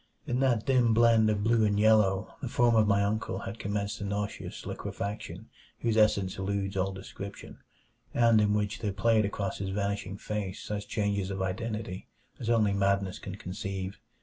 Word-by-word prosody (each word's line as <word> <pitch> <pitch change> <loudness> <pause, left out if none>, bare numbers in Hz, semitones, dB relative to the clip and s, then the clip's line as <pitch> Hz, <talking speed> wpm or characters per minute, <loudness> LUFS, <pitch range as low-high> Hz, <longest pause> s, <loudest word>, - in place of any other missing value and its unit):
In 125 +1 -1
that 125 -5 +2
dim 125 -4 +3
blend 115 -1 +5
of 105 -1 0
blue 115 0 +3
and 105 -1 +2
yellow 105 -3 +3
the 130 - -3
form 120 0 +3
of 110 -1 +4
my 100 0 +3
uncle 110 +2 -1
had 115 - -6
commenced 100 +2 -2
a - - -2
nauseous 100 +1 -4
liquefaction 100 +2 -5 0.3
whose 115 -2 +1
essence 100 -4 +3
eludes 100 0 -2
all 95 0 0
description, 95 +1 -9 0.5
and 115 -2 +4
in 105 0 +2
which 105 +1 -1
there 105 -3 -2
played 110 +2 +3
across 100 -1 -3
his 95 -1 -3
vanishing 100 0 -2
face 100 -3 -4
such 105 -1 -4
changes 100 -2 -1
of 95 -1 -2
identity 105 0 -4 0.3
as 115 - -3
only 110 -4 +3
madness 100 -1 +1
can 95 - -7
conceive. 95 0 -5
105 Hz, 175 wpm, -29 LUFS, 100-110 Hz, 0.5 s, blend